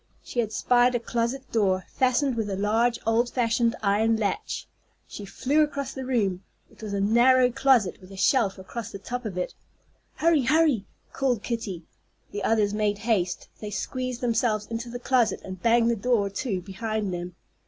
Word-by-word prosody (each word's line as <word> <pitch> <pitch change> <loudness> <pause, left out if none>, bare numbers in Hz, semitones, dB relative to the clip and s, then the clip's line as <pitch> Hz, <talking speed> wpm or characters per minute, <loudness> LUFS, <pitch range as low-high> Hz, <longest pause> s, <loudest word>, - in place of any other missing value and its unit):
She 245 - -4
had 220 -3 0
spied 245 +2 +3
a - - +2
closet 235 +3 -2
door, 190 -4 +1
fastened 260 +1 +2
with 220 -2 -2
a 195 - -2
large 225 +4 +2
old 230 +2 +2
fashioned 230 -1 +1
iron 215 +3 +2
latch. 220 - -2 0.4
She 205 - -8
flew 270 +9 +1
across 280 -3 -1
the 260 -1 -6
room. 200 -7 0 0.3
It - - -18
was 215 -2 -5
a 200 - 0
narrow 245 +5 +4
closet, 250 -7 +2
with 185 +1 -14
a 195 - -10
shelf 205 -1 +2
across 210 +5 -7
the - - -7
top 245 +5 -5
of 195 -4 -4
it. 180 - -2 0.6
"Hurry, 325 -2 +3
hurry!" 290 -5 +2 0.3
called 250 -6 0
Kitty. 215 -8 -4 0.5
The 205 -1 -4
others 210 -2 +2
made 210 -1 0
haste. 205 -5 -1
They 210 - -6
squeezed 255 +5 -4
themselves 230 -3 +1
into 230 +2 -5
the 245 - -5
closet, 245 -4 +1
and 185 -1 -8
banged 235 0 +4
the - - +1
door 210 -2 +1
to 200 -2 -2
behind 210 +1 -3
them. 175 0 -5
230 Hz, 180 wpm, -26 LUFS, 200-250 Hz, 0.6 s, narrow